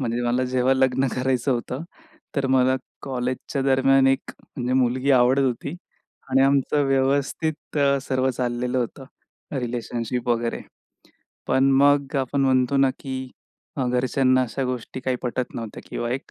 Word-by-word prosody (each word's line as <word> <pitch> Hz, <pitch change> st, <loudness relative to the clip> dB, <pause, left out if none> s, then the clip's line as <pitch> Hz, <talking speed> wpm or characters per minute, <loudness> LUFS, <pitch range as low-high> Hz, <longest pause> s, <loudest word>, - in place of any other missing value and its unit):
म्हणजे 120 Hz, -1 st, -1 dB
मला 125 Hz, +2 st, +1 dB
जेव्हा 130 Hz, +1 st, +2 dB
लग्न 130 Hz, 0 st, +2 dB
करायचं 130 Hz, 0 st, +1 dB
होतं, 125 Hz, +5 st, -4 dB, 0.5 s
तर 135 Hz, -1 st, +1 dB
मला 130 Hz, 0 st, +3 dB, 0.3 s
कॉलेजच्या 130 Hz, +1 st, -3 dB
दरम्यान 135 Hz, 0 st, +4 dB
एक 135 Hz, 0 st, +3 dB
अ, -, -, -14 dB, 0.2 s
म्हणजे 125 Hz, 0 st, -2 dB
मुलगी 130 Hz, +3 st, +1 dB
आवडत 130 Hz, +2 st, +4 dB
होती 130 Hz, +5 st, -2 dB, 0.5 s
आणि 135 Hz, +1 st, +4 dB
आमचं 140 Hz, +1 st, +2 dB
व्यवस्थित 140 Hz, +4 st, 0 dB
अ, 140 Hz, -1 st, +3 dB
सर्व 130 Hz, -1 st, 0 dB
चाललेलं 125 Hz, 0 st, -2 dB
होतं, 125 Hz, +2 st, -4 dB, 0.5 s
रिलेशनशिप 120 Hz, 0 st, -3 dB
वगैरे. 115 Hz, 0 st, 0 dB, 0.9 s
पण 135 Hz, +1 st, +3 dB
मग 140 Hz, 0 st, +3 dB
आपण 135 Hz, +1 st, 0 dB
म्हणतो 130 Hz, 0 st, +2 dB
ना, 135 Hz, -1 st, +4 dB
की 130 Hz, -1 st, -5 dB, 0.5 s
अ, 130 Hz, -3 st, 0 dB
घरच्यांना 130 Hz, +1 st, +2 dB
अशा 130 Hz, +2 st, -3 dB
गोष्टी 125 Hz, 0 st, -4 dB
काही 130 Hz, 0 st, -1 dB
पटत 125 Hz, 0 st, -3 dB
नव्हत्या 115 Hz, -2 st, -6 dB
किंवा 120 Hz, -, -3 dB
एक 135 Hz, -, -5 dB
130 Hz, 145 wpm, -23 LUFS, 125-135 Hz, 0.9 s, दरम्यान